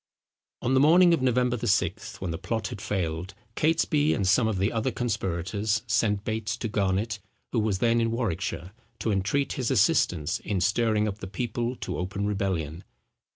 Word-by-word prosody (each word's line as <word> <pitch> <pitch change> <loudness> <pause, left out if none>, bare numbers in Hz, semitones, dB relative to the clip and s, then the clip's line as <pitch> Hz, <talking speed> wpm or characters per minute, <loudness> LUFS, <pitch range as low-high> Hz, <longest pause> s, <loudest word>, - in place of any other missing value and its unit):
On 130 - +1
the 130 - +5
morning 170 +5 +6
of 165 - +1
November 125 -1 +2
the 120 0 -3
6th, 105 +1 0
when 90 -3 -2
the 80 - -4
plot 110 +4 -2
had 115 -6 -7
failed, 90 0 -3 0.2
Catesby 155 -1 +2
and 100 - 0
some 110 +4 +4
of 110 -3 -1
the 95 +3 +1
other 115 +3 0
conspirators 105 -2 -1
sent 115 -4 +1
Bates 110 -2 -2
to - - -3
Garnet, 105 +1 0 0.3
who 120 - +1
was 105 -3 +1
then 115 +3 +2
in 115 - +1
Warwickshire, 95 -5 -2 0.3
to 115 - -1
entreat 105 +9 0
his 130 -5 -2
assistance 100 - +2
in 100 -3 -2
stirring 105 +3 +2
up 105 0 -4
the 95 - -6
people 120 +4 -2
to - - -5
open 95 +3 -2
rebellion. 95 -5 -2
105 Hz, 180 wpm, -27 LUFS, 95-120 Hz, 0.3 s, morning